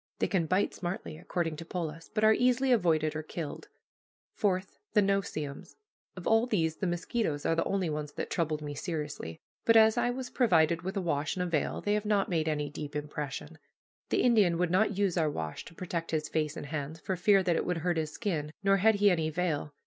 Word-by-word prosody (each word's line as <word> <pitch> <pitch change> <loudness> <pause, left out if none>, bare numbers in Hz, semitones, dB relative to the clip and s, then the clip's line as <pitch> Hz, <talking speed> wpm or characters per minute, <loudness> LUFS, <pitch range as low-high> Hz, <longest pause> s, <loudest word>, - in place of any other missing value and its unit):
They - - +1
can 175 -5 0
bite 185 +4 +1
smartly, 175 -3 -5
according 165 -3 -2
to 165 - -7
Polis, 165 -2 -5
but 215 0 -1
are 220 0 +7
easily 250 +2 +2
avoided 160 -8 +2
or 155 - -2
killed. 155 0 -6 0.7
Fourth, 190 -2 -1
the 210 - +5
no 195 0 +2
see 155 -5 -4
ems. 140 0 -10 0.4
Of 185 - -8
all 225 +2 +4
these, 165 -8 0
the 190 - -1
mosquitoes 175 -2 -1
are - - +3
the 165 - +1
only 195 -3 0
ones 150 -1 -3
that - - -5
troubled 155 -3 -1
me 145 -1 -4
seriously, 150 - -4 0.3
but 230 0 +6
as 220 0 +6
I - - +2
was 250 +1 -4
provided 165 - +3
with 190 +4 -4
a - - +1
wash 145 -4 -1
and 180 - -1
a - - -1
veil, 165 -4 -1
they 205 - 0
have 210 0 0
not 205 -2 +2
made 160 -3 0
any 150 -2 0
deep 145 0 -7
impression. 150 +1 -5 0.5
The - - +2
Indian 210 -9 +4
would 175 -1 +1
not 200 +1 +2
use 195 -3 +1
our 155 -2 +2
wash 80 - -5
to 165 - -13
protect 170 -2 -4
his 155 -1 -1
face 155 -1 -1
and - - -5
hands, 150 +1 -4
for 190 - -2
fear 195 +2 +4
that 175 -2 +2
it - - +1
would 180 -1 -1
hurt 175 -2 +1
his 155 -1 -1
skin, 155 -6 -2
nor 195 0 +4
had 220 +3 +4
he 205 0 +5
any 160 -3 +1
veil. 155 -3 -1
170 Hz, 225 wpm, -30 LUFS, 155-195 Hz, 0.7 s, are